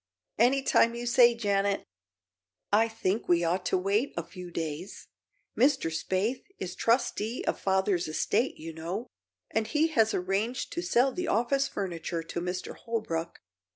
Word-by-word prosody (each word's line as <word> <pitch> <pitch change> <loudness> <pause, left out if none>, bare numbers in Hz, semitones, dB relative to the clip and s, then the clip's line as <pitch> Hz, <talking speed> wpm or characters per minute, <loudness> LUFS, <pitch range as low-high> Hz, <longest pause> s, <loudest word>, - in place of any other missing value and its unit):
"Any 265 +4 +4
time 235 -3 +4
you 240 0 -4
say, 240 0 +6
Janet." 200 -3 0 0.9
"I 220 +2 +5
think 220 -2 -2
we 175 -1 +4
ought 180 +2 0
to - - +2
wait 200 +8 0
a 170 - -1
few 175 +2 -9
days. 165 +3 -5 0.5
Mr. 265 - +3
Spaythe 190 +9 -1 0.2
is 180 -1 -5
trustee 230 +1 0
of - - -1
father's 190 -2 +1
estate, 210 +10 0
you 165 +1 -7
know, 170 +8 -4 0.5
and 220 -1 0
he 310 +5 +2
has 225 -8 +3
arranged 200 +7 -1
to 345 - -2
sell 265 -5 +3
the 360 +4 -3
office 260 +5 +2
furniture 170 -3 -4
to 170 +1 -5
Mr. 180 +1 -4
Holbrook. 170 -8 -3
205 Hz, 155 wpm, -29 LUFS, 180-235 Hz, 0.9 s, say